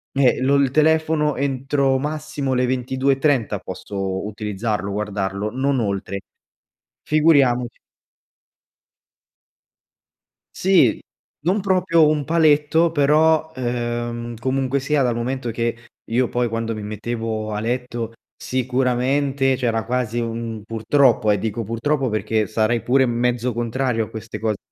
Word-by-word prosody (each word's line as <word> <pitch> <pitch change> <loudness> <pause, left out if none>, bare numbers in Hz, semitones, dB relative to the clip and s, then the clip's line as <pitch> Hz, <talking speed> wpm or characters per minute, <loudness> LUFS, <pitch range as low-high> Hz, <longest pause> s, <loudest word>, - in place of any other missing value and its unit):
Eh 135 -3 +3
lo 135 +2 +3
il 140 -1 +3
telefono 155 0 +2
entro 135 0 0
massimo 150 -1 -3
le 125 0 +1
22.30 130 0 +1
posso 95 -1 -4
utilizzarlo, 105 -1 -3
guardarlo, 100 0 -2
non 135 +3 0
oltre, 100 -2 -2 0.8
figuriamoci 140 -6 +3 2.8
Sì, 180 - +3 0.4
non 190 +4 +2
proprio 180 -4 +3
un 150 -2 0
paletto 160 +1 +3
però, 155 +1 +3
ehm, 120 -1 -3
comunque 130 +2 0
sia 140 +2 +1
dal 125 -3 +1
momento 125 +1 -3
che 115 +1 -1 0.4
io 125 +1 +2
poi 120 0 0
quando 115 0 -3
mi 105 - -6
mettevo 110 0 -4
a 105 - -2
letto 120 0 -3 0.3
sicuramente 130 +2 0
c’era 115 -3 -1
quasi 120 -1 -1
un 115 -1 -4
purtroppo 115 0 +2
eh, 105 - +1
dico 110 +2 -3
purtroppo 130 +5 -1
perché 110 0 0
sarei 110 +1 0
pure 130 +2 +3
m - - -1
mezzo 125 0 0
contrario 120 0 -1
a - - -14
queste 110 0 -7
cose, 110 -2 -1
125 Hz, 120 wpm, -21 LUFS, 115-140 Hz, 2.8 s, Eh